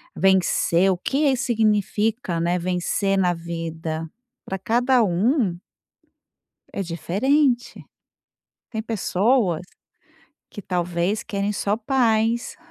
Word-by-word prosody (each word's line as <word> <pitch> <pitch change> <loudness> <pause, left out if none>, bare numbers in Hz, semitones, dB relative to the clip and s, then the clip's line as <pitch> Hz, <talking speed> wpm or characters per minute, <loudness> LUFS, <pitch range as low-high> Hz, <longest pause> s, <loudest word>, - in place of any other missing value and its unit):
vencer, 190 -1 +3
o 180 - -1
que 275 +8 +1
isso 255 - -1
significa, 215 -4 0
né, 175 +2 +1
vencer 185 +2 0
na 180 -2 +2
vida 165 -1 -5 0.4
pra 190 - -4
cada 245 +3 +2
um 195 - +1 1.1
é 200 - -2
diferente, 240 - 0 0.9
tem 220 -2 -3
pessoas 210 -4 +1 0.9
que 205 - -8
talvez 180 +4 -1
querem 200 -1 -2
só 205 +1 -1
paz. 230 -1 +1
200 Hz, 100 wpm, -23 LUFS, 175-235 Hz, 1.1 s, vencer